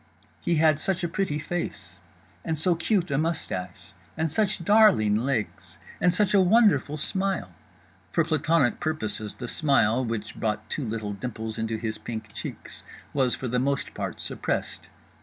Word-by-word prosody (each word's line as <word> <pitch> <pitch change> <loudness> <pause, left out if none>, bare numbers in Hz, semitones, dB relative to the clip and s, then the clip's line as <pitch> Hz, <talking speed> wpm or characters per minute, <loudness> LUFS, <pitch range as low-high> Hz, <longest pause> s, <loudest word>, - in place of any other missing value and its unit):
He 170 - 0
had 155 -1 +4
such 185 +1 -1
a - - +2
pretty 165 -3 -1
face! 175 +3 -5 0.4
and 160 -1 -1
so 175 +4 +3
cute 175 0 0
a 135 - +2
moustache! 95 - -3 0.2
and 160 -1 0
such 195 -1 0
darling 205 - +5
legs! 115 -2 -2 0.2
and 180 - +5
such 195 +2 +2
a 200 - +6
wonderful 185 - +4
smile! 190 - -1 0.6
For 165 - +3
plantonic 155 -4 +2
purposes 110 -10 -2
the 125 - -6
smile—which 115 -6 +1
brought 110 -1 -1
two 145 - -2
little 110 -2 -3
dimples 110 0 -5
into 110 0 -1
his 110 -1 -3
pink 110 -2 -6
cheeks—was 130 -3 -3
for 130 - -4
the 125 +1 +1
most 140 +2 0
part - - -4
suppressed. - - -3
145 Hz, 150 wpm, -26 LUFS, 110-170 Hz, 0.6 s, a